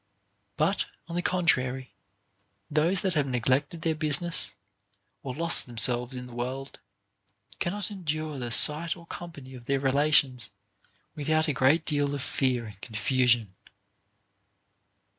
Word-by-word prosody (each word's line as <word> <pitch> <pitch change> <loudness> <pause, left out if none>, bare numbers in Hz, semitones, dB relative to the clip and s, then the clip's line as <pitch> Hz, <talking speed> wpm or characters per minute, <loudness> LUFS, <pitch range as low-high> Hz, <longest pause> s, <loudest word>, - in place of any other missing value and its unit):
But, 170 +7 +1 0.2
on 170 - -6
the 175 - 0
contrary, 130 - 0 0.8
those 165 +5 +2
that 190 -3 -1
have 145 -4 0
neglected 135 +6 -1
their 165 -2 +1
business, 155 - +1 0.7
or 130 -2 -6
lost 170 -1 +4
themselves 120 +2 +1
in 125 0 -6
the 125 - -12
world, 130 +3 -5 0.8
cannot 205 +3 -3
endure 155 -6 -4
the 120 -1 -4
sight 150 - +5
or 170 - -14
company 150 -7 -9
of 125 -2 -11
their 140 +2 0
relations 135 -3 +2 0.6
without 155 +1 0
a 150 - 0
great 135 +6 +3
deal 145 -1 0
of 140 - -4
fear 130 -5 0
and 105 -2 -12
confusion. 120 -1 +1
140 Hz, 130 wpm, -27 LUFS, 125-160 Hz, 0.8 s, sight